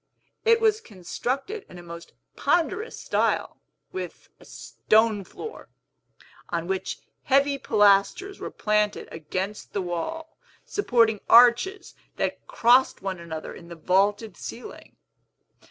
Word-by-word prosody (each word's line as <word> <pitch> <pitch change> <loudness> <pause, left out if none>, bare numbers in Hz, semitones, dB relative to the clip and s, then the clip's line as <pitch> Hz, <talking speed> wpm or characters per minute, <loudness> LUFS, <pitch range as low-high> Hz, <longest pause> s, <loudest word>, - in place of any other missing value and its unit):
It 460 0 +5
was 440 -1 +2
constructed 260 - -4
in 180 - -12
a 175 - -10
most 170 0 -10 0.2
ponderous 425 +7 0
style, - - 0 0.3
with 185 -2 -7
a - - -17
stone 215 -2 +1
floor, 445 - -10 0.8
on 170 -1 -2
which 190 +1 -3 0.3
heavy 275 +1 +3
pilasters 210 - +3
were - - -5
planted 210 -1 0
against 185 +6 -5
the 200 - -1
wall, 320 - -5 0.3
supporting 230 - +2
arches 245 - +5 0.2
that - - -3
crossed 245 +3 +3
one 190 -2 -3
another 160 -2 -7
in 170 - -12
the 170 - -9
vaulted 200 +6 +1
ceiling. 240 - -9
215 Hz, 120 wpm, -25 LUFS, 185-280 Hz, 0.8 s, It